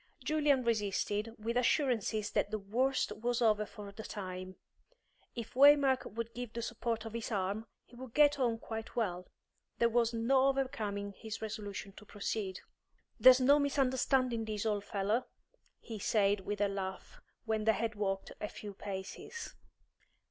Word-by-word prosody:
Julian 295 -4 +2
resisted, 210 0 0
with 230 +2 -3
assurances 240 -5 +1
that - - +1
the 215 - -1
worst 245 +7 0
was 240 +1 -1
over 215 -3 +3
for 205 -1 -9
the 210 - -8
time. 185 -3 -6 0.8
If 230 -2 -6
Waymark 275 -1 +5
would 230 0 -4
give 245 -1 -6
the 235 - -3
support 230 -1 -2
of 225 - -6
his 230 +1 -4
arm, 205 +2 -1 0.2
he 245 - -18
would 250 -1 -10
get 290 -1 +5
on 235 -3 +2
quite 225 0 -7
well. 185 -6 -1 0.5
There 235 - +3
was 235 0 +2
no 260 +4 +3
overcoming 215 -7 -1
his 220 -1 -6
resolution 205 -2 -5
to 210 - -12
proceed. 200 -2 -3 0.6
"There's 255 0 +9
no 280 +3 +5
misunderstanding 260 -4 +1
this, 215 0 -3
old 205 -2 0
fellow," 205 +5 0 0.5
he 225 -3 -7
said, 205 0 +2
with 205 +1 -4
a 205 - +4
laugh, 195 - -5 0.2
when 220 -1 -1
they 220 - +5
had 225 +1 -1
walked 195 -2 -2
a 210 - -2
few 205 -1 -8
paces. 195 - -6
225 Hz, 155 wpm, -33 LUFS, 205-250 Hz, 0.8 s, There's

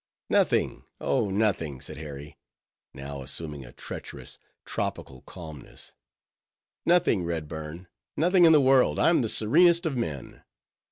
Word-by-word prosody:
"Nothing, - - +1 0.2
oh 120 -6 0
nothing," 95 - 0
said 65 - -8
Harry, 75 -1 -9 0.5
now 70 0 -8
assuming 75 +1 -4
a - - -12
treacherous, - - -9 0.3
tropical 65 -1 -4
calmness—"nothing, 85 - -4
Redburn; 80 +1 -5 0.3
nothing 175 +3 +4
in 165 - +7
the 155 - +7
world. 130 -1 +4
I'm 170 -3 +4
the 115 - -1
serenest 170 - +4
of 155 -4 -1
men." 75 - -5
85 Hz, 115 wpm, -27 LUFS, -, 0.5 s, in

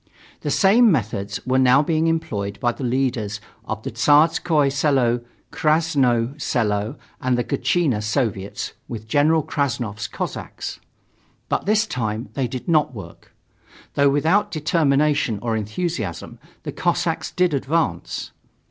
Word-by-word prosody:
The - - -3
same 220 +3 +5
methods 100 - -1
were 130 +1 +2
now 130 +2 +5
being 160 +1 +1
employed 105 -11 -2
by 120 - +1
the 130 - -8
leaders 120 -5 -1 0.3
of - - -5
the - - -4
Tsarskoye 150 -1 +3
Selo, 135 -4 +2 0.3
Krasnoye 145 -5 +1
Selo 105 -1 0 0.3
and 125 -1 +1
the 120 - +1
Gatchina 145 -10 0
Soviets 105 -3 -2
with 110 -2 -7
General 155 +6 +3
Krassnov's 120 -9 -2
Cossacks. - - -5 0.7
But - - -1
this 215 +1 +3
time 115 - -3
they 135 -3 -1
did 125 +1 -7
not 155 -6 +2
work. 100 - -11 0.6
Though 140 0 +4
without 160 +9 +2
determination 150 -6 +1
or 115 0 -1
enthusiasm, 110 - -4 0.2
the - - -4
Cossacks - - -1
did 180 -3 +1
advance. 140 - -1
135 Hz, 130 wpm, -22 LUFS, 110-155 Hz, 0.7 s, same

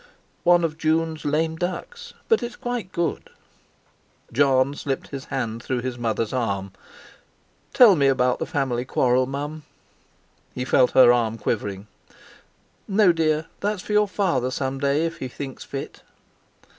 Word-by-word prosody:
"One 175 0 +5
of 160 -1 -2
June's 160 0 0
'lame 160 +2 0
ducks.' 180 - -5
But 450 - +3
it's 240 0 -5
quite 245 -6 -4
good." 170 -2 -2 1.0
Jon 135 +1 +3
slipped 140 -2 -4
his 135 -1 -7
hand 115 -4 -3
through 125 0 -2
his 130 0 -4
mother's 115 -1 -1
arm. 100 -6 -2 1.0
"Tell 245 -8 +7
me 140 -4 +3
about 125 -2 +2
the - - -3
family 130 -4 -1
quarrel, 125 0 +2
Mum." 145 +3 -5 0.9
He 125 - -3
felt 130 -1 +3
her 125 -2 +7
arm 115 -2 0
quivering. 100 -3 -3 1.0
"No, 195 -2 +4
dear; 160 -1 0
that's 205 -2 -2
for 210 - -4
your 210 0 +4
Father 180 -10 0
some 135 +1 -3
day, 140 +3 +1
if 165 0 -4
he 130 - -4
thinks 135 +1 -7
fit." 135 0 -7
140 Hz, 145 wpm, -23 LUFS, 125-165 Hz, 1.0 s, Tell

